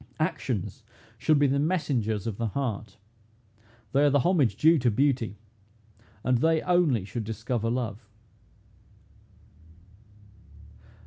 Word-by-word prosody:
Actions - - -2 0.4
should 150 +6 +3
be 145 - +4
the 140 0 +2
messengers 130 - -1
of 110 -4 -3
the 115 - -1
heart; 110 -4 -4 0.9
they 140 +2 +3
are 145 - +5
the 140 -1 +3
homage 150 - +2
due 160 +8 +4
to 125 -1 +2
beauty, 120 -2 0 0.9
and 125 -1 +2
they 160 +2 +3
only 170 - +2
should 115 +3 -5
discover 115 +1 -3
love." 115 -3 -4
125 Hz, 115 wpm, -27 LUFS, 110-145 Hz, 0.9 s, are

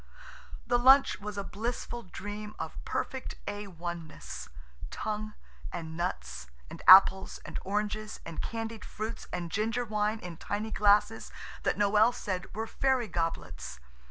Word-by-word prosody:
The 245 -1 +3
lunch 270 +3 +6
was 210 0 -6
a 200 - -1
blissful 235 +4 -4
dream 210 +1 -7
of - - -6
perfect 265 -1 -3
A.1. 175 -5 -5
ness. 65 - -8 0.4
Tongue, 215 0 -4 0.4
and 160 -2 -5
nuts, 65 - -3 0.2
and - - -8
apples, 190 0 +8
and - - -5
oranges, 210 +2 -2
and 165 - -5
candied 225 -1 -4
fruits, 220 +1 -5
and 170 -2 -3
ginger 225 +5 0
wine 215 0 0
in 175 -4 -8
tiny 210 +5 -3
glasses 210 +1 +3 0.3
that - - 0
Noël 210 +3 +5
said 190 -1 -3
were 220 +1 -1
fairy 260 0 +1
goblets. 165 - -3
210 Hz, 135 wpm, -30 LUFS, 180-220 Hz, 0.4 s, apples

